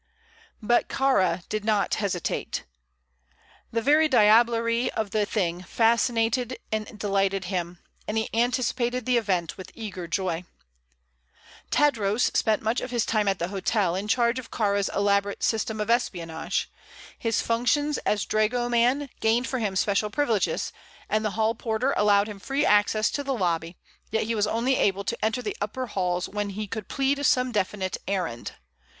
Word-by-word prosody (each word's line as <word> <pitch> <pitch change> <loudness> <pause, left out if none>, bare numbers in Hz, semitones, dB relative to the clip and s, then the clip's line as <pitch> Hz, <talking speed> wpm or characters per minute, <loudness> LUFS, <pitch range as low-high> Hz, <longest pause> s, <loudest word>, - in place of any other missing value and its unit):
But 240 +3 +2
Kāra 185 -10 +1
did 215 -1 -3
not 210 -2 +1
hesitate. 190 -5 -2 1.1
The 230 0 -1
very 305 +3 +4
diablerie 230 0 +4
of 215 -3 -3
the 210 -1 +1
thing 180 -5 -1
fascinated 235 +4 +1
and 215 0 -3
delighted 195 -2 0
him, 175 -1 -3 0.3
and 215 - -2
he 220 - 0
anticipated 245 +1 0
the 250 -1 +3
event 185 -7 -1
with 185 - -9
eager 195 -6 -6
joy. 180 -2 -1 1.3
Tadros 230 -6 +2
spent 220 -1 +2
much 225 +3 0
of - - -5
his 240 -2 0
time 215 -2 +1
at 195 -1 +2
the 170 +1 -3
hotel, 195 -1 0
in 195 +3 -3
charge 235 +2 +2
of 250 - -9
Kāra's 200 -2 0
elaborate 200 0 +1
system 220 -1 0
of 210 +2 0
espionage. 170 -9 -1 0.5
His 230 -1 0
functions 260 +6 +1
as 210 - 0
dragoman 240 +5 +1
gained 230 +3 +2
for 260 -1 -2
him 205 -4 -2
special 200 +2 +1
privileges, 230 -5 0 0.4
and 215 0 +1
the 215 - +1
hall 220 0 +2
porter 230 +4 -1
allowed 205 0 +4
him 210 -2 -8
free 275 +7 -1
access 210 +1 +3
to 285 - -2
the 275 -1 -1
lobby; 170 -4 -1 0.3
yet 220 - 0
he 225 +2 -1
was 210 -2 +1
only 235 +5 +1
able 200 0 +1
to - - -2
enter 225 +3 0
the 210 - -3
upper 235 +5 -3
halls 180 -5 -1
when 205 0 -3
he 210 +2 -4
could 210 0 -6
plead 280 +1 0
some 255 -2 +3
definite 195 -2 -1
errand. 180 -12 -3
215 Hz, 160 wpm, -26 LUFS, 200-240 Hz, 1.3 s, very